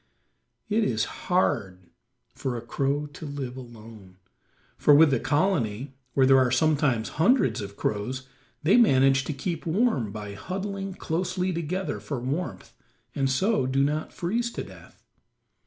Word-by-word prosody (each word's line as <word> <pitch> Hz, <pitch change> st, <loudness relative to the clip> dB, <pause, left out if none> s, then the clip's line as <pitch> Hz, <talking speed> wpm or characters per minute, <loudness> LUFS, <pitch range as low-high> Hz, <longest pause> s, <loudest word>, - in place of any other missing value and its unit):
It 220 Hz, +1 st, +1 dB
is 110 Hz, -, +1 dB, 0.2 s
hard 95 Hz, -, 0 dB, 0.4 s
for 130 Hz, -3 st, -3 dB
a -, -, -5 dB
crow 140 Hz, +5 st, -1 dB
to 160 Hz, -, -8 dB
live 135 Hz, -3 st, -5 dB
alone, 110 Hz, -6 st, -12 dB, 0.6 s
for 145 Hz, -, +5 dB
with 155 Hz, 0 st, +6 dB
the 135 Hz, -, +2 dB
colony, 140 Hz, -, 0 dB, 0.2 s
where 135 Hz, -, +5 dB
there 135 Hz, 0 st, +6 dB
are 130 Hz, -1 st, +3 dB
sometimes 130 Hz, -3 st, +2 dB
hundreds 240 Hz, -, +3 dB
of 100 Hz, 0 st, -8 dB
crows, 130 Hz, +6 st, -3 dB, 0.4 s
they 170 Hz, +10 st, +5 dB
manage 135 Hz, -, +4 dB
to -, -, -2 dB
keep 165 Hz, +4 st, -4 dB
warm 160 Hz, -, +1 dB
by 105 Hz, -1 st, -7 dB
huddling 195 Hz, -, -5 dB
closely 180 Hz, +2 st, -2 dB
together 170 Hz, 0 st, -3 dB
for 140 Hz, -4 st, -4 dB
warmth, 140 Hz, +9 st, -4 dB, 0.4 s
and 135 Hz, -1 st, 0 dB
so 185 Hz, -, +1 dB
do 135 Hz, +1 st, +2 dB
not 150 Hz, +2 st, -1 dB
freeze 230 Hz, +7 st, -1 dB
to -, -, -4 dB
death. -, -, -15 dB
140 Hz, 145 wpm, -26 LUFS, 125-180 Hz, 0.6 s, with